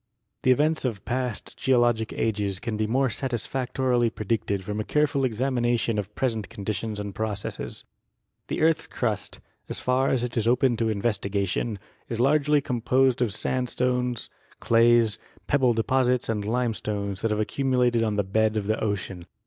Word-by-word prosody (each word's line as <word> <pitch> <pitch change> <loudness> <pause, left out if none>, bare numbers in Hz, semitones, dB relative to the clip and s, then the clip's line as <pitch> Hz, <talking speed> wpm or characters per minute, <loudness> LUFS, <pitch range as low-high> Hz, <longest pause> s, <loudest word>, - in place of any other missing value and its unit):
The - - +1
events 150 +5 +3
of 115 -7 -3
past 125 -3 -3
geologic 120 -4 +2
ages 105 -4 -1
can 115 -1 -3
be 110 0 0
most 130 +1 +1
satisfactorily 125 -1 0
predicted 105 -2 -2
from 105 +2 -4
a - - 0
careful 145 +1 +1
examination 120 -2 0
of 105 +1 -6
present 115 -5 -1
conditions 105 -1 -4
and 100 -1 -5
processes. 105 -1 -4 0.6
The - - -2
earth's 160 0 +3
crust, 110 -5 -3 0.3
as - - -3
far 130 +2 +1
as 125 -3 +1
it 120 -1 -3
is 115 -2 +1
open 125 +1 +3
to 115 -1 +1
investigation, 100 0 -1 0.3
is 115 - -3
largely 145 +3 +3
composed 125 0 +1
of 120 -4 +2
sandstones, 125 +1 -1 0.3
clays, 115 -1 +4 0.3
pebble 130 -4 +3
deposits 125 +1 +1
and 105 -2 -1
limestones 105 -4 -2
that 115 - +1
have 105 0 0
accumulated 125 0 +1
on 110 -2 0
the 105 - +1
bed 110 +3 +1
of 105 - -1
the 110 +2 -1
ocean. 95 -4 -3
115 Hz, 155 wpm, -26 LUFS, 105-125 Hz, 0.6 s, clays